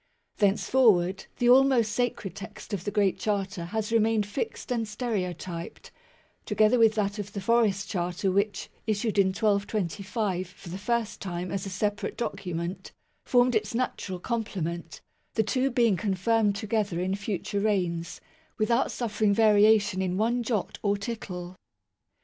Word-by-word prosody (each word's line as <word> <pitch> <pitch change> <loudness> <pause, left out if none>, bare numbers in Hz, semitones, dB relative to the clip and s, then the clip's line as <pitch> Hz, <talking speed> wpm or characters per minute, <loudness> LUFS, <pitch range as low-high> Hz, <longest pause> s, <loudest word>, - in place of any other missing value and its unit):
Thenceforward 200 -3 +3
the 245 - +1
almost 250 -3 +5
sacred 230 -5 -1
text 200 +2 -9
of 195 -3 -3
the - - 0
Great 205 -2 +1
Charter 195 -4 -2
has 215 +4 -3
remained 225 -2 +3
fixed 280 - -4
and 230 -3 0
stereotyped, 185 -6 -4 0.5
together 215 +3 +3
with 220 -1 +5
that 205 0 -1
of 205 0 -6
the 200 - -3
Forest 205 -1 +2
Charter 180 +1 -1
which, 200 +1 -1 0.2
issued 215 0 0
in 195 - +5
1225 200 -1 -1
for 180 0 -13
the 185 +3 -5
first 235 +1 -1
time 180 -1 -4
as 195 0 -3
a - - -4
separate 205 +2 -2
document, 180 -5 -4 0.3
formed 245 0 +4
its 215 0 0
natural 215 -6 -2
complement, 175 -6 -4 0.3
the 220 - +3
two 255 +5 +1
being 235 -5 +3
confirmed 205 +1 +1
together 205 -3 -1
in 185 +1 0
future 200 0 -3
reigns, 175 -5 -1 0.4
without 235 +4 +2
suffering 215 -3 0
variation 210 -2 +4
in 185 -1 -1
one 235 +4 +1
jot 225 -4 -2
or 205 -1 +1
tittle. 185 -4 -6
205 Hz, 145 wpm, -27 LUFS, 190-225 Hz, 0.5 s, almost